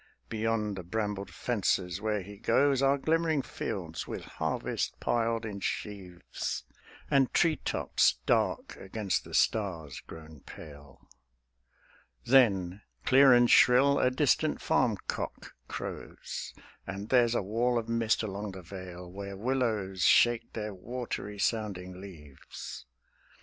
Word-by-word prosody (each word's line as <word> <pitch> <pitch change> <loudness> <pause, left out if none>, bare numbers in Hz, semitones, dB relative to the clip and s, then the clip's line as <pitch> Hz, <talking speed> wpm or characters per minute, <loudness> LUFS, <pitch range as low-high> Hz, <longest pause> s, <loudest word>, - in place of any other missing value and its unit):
Beyond 110 -2 -1
the 95 - -5
brambled 105 +1 -3
fences 95 -6 -1
where 105 -2 -1
he 100 +1 -11
goes 135 +4 +3
Are 135 +1 +4
glimmering 160 0 +1
fields - - -5
with - - -5
harvest - - -3
piled 115 -1 0
in 100 -2 -5
sheaves, 95 -2 -4 0.5
And 135 -2 +4
tree 165 -3 +4
tops - - +1
dark - - 0
against 100 0 -2
the - - -6
stars 85 - 0
grown 80 -2 -12
pale; 70 0 -13 1.2
Then, 100 -7 +4 0.2
clear 135 +1 +7
and 120 -1 +6
shrill, 130 +4 +6
a 125 - +4
distant 130 - +1
farm - - +2
cock - - -5
crows; - - -6 0.4
And 100 +2 -6
there's 120 -2 +4
a - - +1
wall 120 +5 +1
of 115 -1 -2
mist 115 -1 +1
along 100 -1 -4
the 95 -1 -9
vale 90 -1 -9
Where 100 +2 -7
willows 110 -6 -1
shake 120 +7 +4
their 105 -2 -4
watery 105 0 -5
sounding 95 -4 -2
leaves. 75 -7 -10
105 Hz, 125 wpm, -30 LUFS, 95-120 Hz, 1.2 s, clear